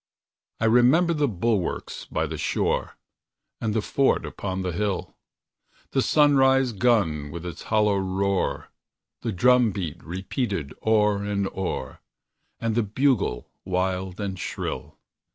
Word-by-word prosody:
I 115 - +1
remember 125 +10 +5
the 150 -2 +1
bulwarks 105 -3 -2
by - - -1
the - - -5
shore, - - -1 0.6
And 110 -1 -1
the 110 - +1
fort 135 +5 +2
upon 95 -1 -4
the 90 - -1
hill; 100 0 -2 0.8
The 135 - +2
sunrise 135 -3 +4
gun, 100 -10 +1
with 85 +3 -7
its 85 -3 -6
hollow 105 -2 +3
roar, 95 +1 -1 0.5
The 115 - -2
drum 125 +5 +4
beat 90 -4 -5
repeated 95 - -3
o'er 105 -2 +3
and 100 -1 -1
o'er, 90 -9 -4 0.6
And 115 -1 -1
the 120 - +2
bugle 110 - 0
wild 95 0 -2
and 95 -3 -3
shrill. - - -5
100 Hz, 130 wpm, -25 LUFS, 95-120 Hz, 0.8 s, remember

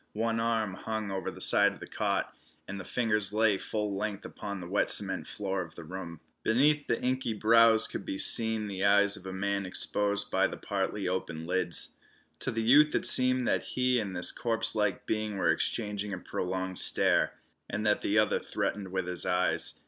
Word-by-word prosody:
One 115 +1 -1
arm 115 -3 0
hung 110 +1 -4
over 95 -1 -3
the - - -10
side - - +4
of - - -14
the - - -8
cot, - - -2 0.3
and 100 0 -6
the - - -6
fingers 105 -2 0
lay 110 -2 +2
full 105 -2 -3
length 100 0 -4
upon 100 -2 -6
the 90 - -8
wet 95 +4 0
cement 95 -2 +2
floor 95 -2 -3
of 85 -2 -9
the 85 - -9
room. 85 -1 -8 0.2
Beneath 145 +6 +2
the 115 - 0
inky 130 -2 -1
brows 115 +1 +5
could - - -6
be 95 - -4
seen 110 +1 +1
the 95 -2 -4
eyes 100 0 +4
of - - -9
the 95 +1 -7
man 100 +1 -2
exposed 100 +2 -1
by - - +3
the - - -7
partly 100 0 -3
opened 85 -3 -3
lids. 90 -1 -1 0.4
To - - -2
the 115 0 -2
youth 150 +6 +5
it - - +1
seemed 130 -1 +5
that - - +1 0.2
he 125 -1 +2
and 100 -4 -4
this 90 - +2
corpse 115 -1 +1
like 105 -3 -1
being 110 -2 -2
were 85 -4 +2
exchanging 105 +3 -2
a - - -3
prolonged 95 +1 -4
stare, - - +2 0.4
and 105 +2 -3
that 105 0 +2
the 105 - 0
other 110 - +3
threatened 100 -2 -3
with 95 -1 -2
his 90 0 -2
eyes. 90 0 0
105 Hz, 200 wpm, -29 LUFS, 95-110 Hz, 0.4 s, brows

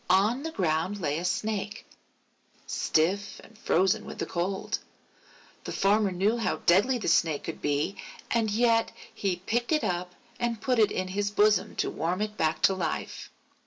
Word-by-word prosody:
On 205 +8 +3
the 325 - -3
ground 185 - -1
lay 150 -3 -1
a - - -5
Snake, 210 +2 -2 0.8
stiff 190 +6 0
and 220 - -17
frozen 190 -3 +2
with - - -8
the - - -2
cold. 185 +3 -2 0.9
The - - -4
Farmer 205 +1 +2
knew 200 +6 +1
how 225 - 0
deadly 205 +9 +4
the 225 - -4
Snake 160 -2 +2
could 165 - -6
be, 145 +6 0 0.3
and 225 -2 +2
yet 230 +1 +2 0.2
he 185 -3 -2
picked 240 +4 0
it 305 -1 +2
up 180 0 -2 0.2
and 235 -2 -1
put 250 0 +1
it 215 - +4
in 185 0 -2
his 200 +2 -1
bosom 210 0 +2
to - - -1
warm 175 +4 -2
it 210 0 -2
back 155 -4 0
to 195 - +6
life. 185 -2 -4
200 Hz, 170 wpm, -28 LUFS, 180-220 Hz, 0.9 s, to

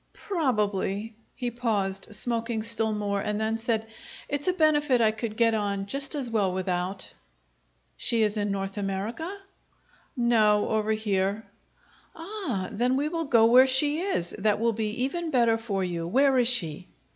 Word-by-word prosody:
"Probably." 210 - -1 0.2
He 245 -1 -3
paused, 205 -5 -1
smoking 230 -1 -1
still 225 -1 +1
more, 205 -1 -1
and 210 +1 -2
then 220 +1 -1
said, 225 -1 -1 0.4
"It's 285 +2 -2
a 365 - +3
benefit 295 -6 +3
I 220 -2 +4
could 220 0 -5
get 230 -1 +3
on 200 -2 -1
just 275 +7 -3
as 275 -4 -1
well 205 -5 0
without." 185 0 -3 0.8
"She 230 -2 +3
is 210 0 +1
in 205 -1 -1
North 195 0 -3
America?" 205 - -3 0.9
"No; 215 -4 +3
over 220 0 0
here." 205 -1 -1 0.7
"Ah! 325 - -4
Then 245 +3 +1
we 290 +3 0
will 330 0 -2
go 235 -5 +5
where 250 +3 +7
she 290 +4 +2
is. 355 - -2
That 210 +1 +1
will 230 0 +1
be 220 +2 -2
even 335 +5 -2
better 235 -5 +3
for 200 -4 -2
you! 170 -2 -3
Where 265 +6 +3
is 240 - +3
she?" 180 -8 +1
225 Hz, 160 wpm, -27 LUFS, 200-255 Hz, 0.9 s, where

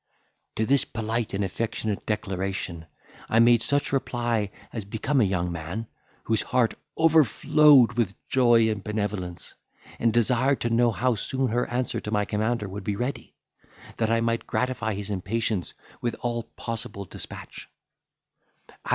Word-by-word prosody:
To 110 - +1
this 135 +2 +4
polite 115 0 -3
and 100 - 0
affectionate 110 +1 -3
declaration, 95 -5 -3 0.4
I 110 - +2
made 115 0 +6
such 140 +4 +1
a - - +2
reply 120 -5 -1 0.2
as 110 - -3
became 115 +7 0
a - - +5
young 90 -2 -1
man, 85 +7 -5 0.4
whose 110 -1 +1
heart 125 -3 +1 0.2
overflowed 150 -4 +5
with 110 -5 0
joy 120 -3 +4
and 100 -2 -4
benevolence, 105 -5 -4 0.5
and 115 - +3
desired 125 +4 +2
to 120 - 0
know 120 +1 +4
how 125 +2 +1
soon 130 +4 -1
her 120 +2 0
answer 125 +1 -1
to - - -6
my 105 -1 +1
commander 110 +1 -1
would 95 +1 -7
be 105 0 -1
ready, 125 +6 -4 0.6
that 110 -1 +1
I 115 0 +2
might 115 0 -1
gratify 125 -4 -1
his 100 +1 -5
impatience 100 0 -1 0.3
with 120 - -1
all 120 -1 -1
possible 115 -3 -5
despatch. - - -9
115 Hz, 150 wpm, -26 LUFS, 105-120 Hz, 0.6 s, made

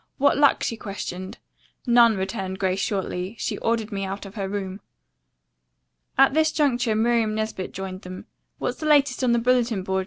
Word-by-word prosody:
"What 285 +1 +4
luck?" 285 -1 +4
she 230 - -2
questioned. 190 -3 -6 0.5
"None," 235 -3 +5
returned 190 0 -3
Grace 190 0 0
shortly. 190 0 -2
"She - - -3
ordered 230 -1 -1
me 195 -1 -3
out 195 +1 -5
of 195 - -10
her 195 -2 -4
room." 195 -1 -4 1.4
At 270 0 +6
this 315 +1 +3
juncture 245 -7 +1
Miriam 225 -1 +2
Nesbit 215 -3 -3
joined 190 0 -6
them. 185 -1 -9 0.3
"What's - - -3
the 310 - -3
latest 285 -3 +3
on 250 - +3
the 235 - +3
bulletin 235 -4 +1
board?" 190 0 -1
215 Hz, 175 wpm, -24 LUFS, 190-240 Hz, 1.4 s, At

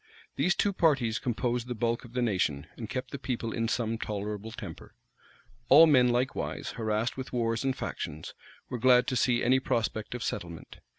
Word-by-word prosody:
These 180 - +2
two 205 - +1
parties 135 - +2
composed 120 -1 -1
the 125 - -3
bulk 115 +2 -1
of 120 - -14
the 125 -1 0
nation, 90 -10 0
and 110 -3 -7
kept 130 +1 -4
the 140 - -5
people 120 -4 -3
in 115 0 -1
some 115 -1 -1
tolerable 105 0 -4
temper. - - -9 0.7
All 165 - +9
men, 130 -6 +5
likewise, 125 +2 -1
harassed 110 +1 -1
with 130 0 -6
wars 115 -1 0
and 135 -1 0
factions, 80 +2 -5 0.3
were 125 - -4
glad 125 +1 +5
to 130 - -1
see 120 0 +2
any 130 +2 +4
prospect 110 -2 -2
of 120 - -4
settlement. 85 -5 -6
120 Hz, 180 wpm, -29 LUFS, 110-130 Hz, 0.7 s, All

